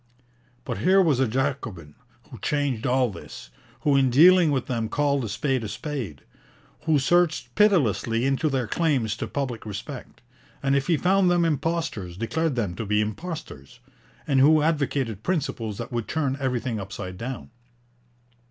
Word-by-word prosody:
But - - -4
here 190 +2 +4
was 160 -9 +3
a 135 - +3
Jacobin 115 - -3 0.4
who 120 - -10
changed 140 -2 -1
all 125 -2 +2
this; 85 -8 -11 0.3
who 145 -2 +2
in 135 -1 +4
dealing 170 +6 +6
with 135 -3 0
them 115 -3 -2
called 140 -1 +1
a 110 - -4
spade 130 +4 -1
a - - -3
spade; 125 - -5 0.6
who 160 -2 +3
searched 170 +4 +1
pitilessly 130 - +2
into 135 +3 +1
their 130 -3 0
claims 130 - 0
to - - -4
public 130 -5 -3
respect, 110 +6 -8 0.4
and 135 0 +2
if 140 -1 0
he 170 -3 +3
found 185 +3 +3
them 175 -1 +3
impostors 155 - -2
declared 140 +7 -1
them 105 -7 -1
to 110 - -3
be 105 +1 +2
impostors; 110 - -5 0.5
and 135 -2 +2
who 150 +3 +5
advocated 140 - 0
principles 115 - -2
that 115 - -6
would 120 -2 -3
turn 140 -4 -1
everything 125 -4 -2
upside 95 -1 -6
down. 125 +1 -6
135 Hz, 160 wpm, -25 LUFS, 115-155 Hz, 0.6 s, dealing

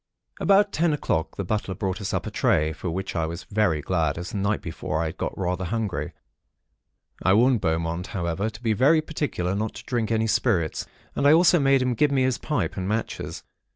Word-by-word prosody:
"About 200 +1 +4
ten 165 -2 +2
o'clock, 80 - -1
the 100 - -2
butler 100 0 -2
brought 95 +2 -3
us 100 - -3
up - - -2
a - - -5
tray; 75 +1 +2
for 85 +3 -5
which 95 +3 -4
I 80 -2 0
was 85 +3 -6
very 100 -8 +1
glad; 80 -5 0
as 85 +2 -5
the - - -4
night 100 +2 +1
before 80 0 -3
I 80 0 -3
had - - -34
got - - -3
rather 90 0 -1
hungry. 90 -7 -2 1.1
I 95 - +4
warned 120 0 +4
Beaumont, 85 +1 -1
however, 90 +3 -2
to 110 +2 -13
be 110 -2 +2
very 140 +9 +4
particular 145 - -2
not 105 +2 -2
to - - -9
drink 120 -4 -1
any 110 0 +2
spirits, 100 -8 0 0.3
and 140 - +2
I 145 - +8
also 175 +1 +5
made 135 -2 +4
him 125 -1 +1
give 145 +6 +3
me 135 -2 +2
his 130 -1 +1
pipe 150 -1 -2
and 95 -1 -2
matches. 110 +2 -3
100 Hz, 215 wpm, -25 LUFS, 85-125 Hz, 1.1 s, I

